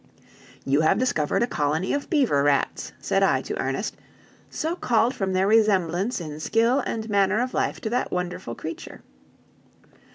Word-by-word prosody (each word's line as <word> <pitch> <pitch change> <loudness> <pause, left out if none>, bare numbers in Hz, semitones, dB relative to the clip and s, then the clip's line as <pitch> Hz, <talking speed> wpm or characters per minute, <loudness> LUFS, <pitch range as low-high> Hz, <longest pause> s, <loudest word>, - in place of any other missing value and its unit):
"You 140 +3 +2
have 160 +5 +3
discovered 240 -9 +1
a - - +3
colony 155 -3 -1
of 285 0 -3
beaver 260 - +2
rats," 145 0 0
said - - 0
I - - +2
to - - -5
Ernest, - - -2 0.5
"so 320 +2 -2
called 240 -5 +1
from 195 -6 -2
their 185 +1 +2
resemblance 200 -1 +2
in 155 -3 -7
skill 230 - +2
and 220 -1 -3
manner 200 0 +2
of 250 +1 -2
life - - -1
to 220 - -3
that 250 +1 -1
wonderful 180 -9 -4
creature. 160 0 -8
195 Hz, 160 wpm, -24 LUFS, 160-240 Hz, 0.5 s, have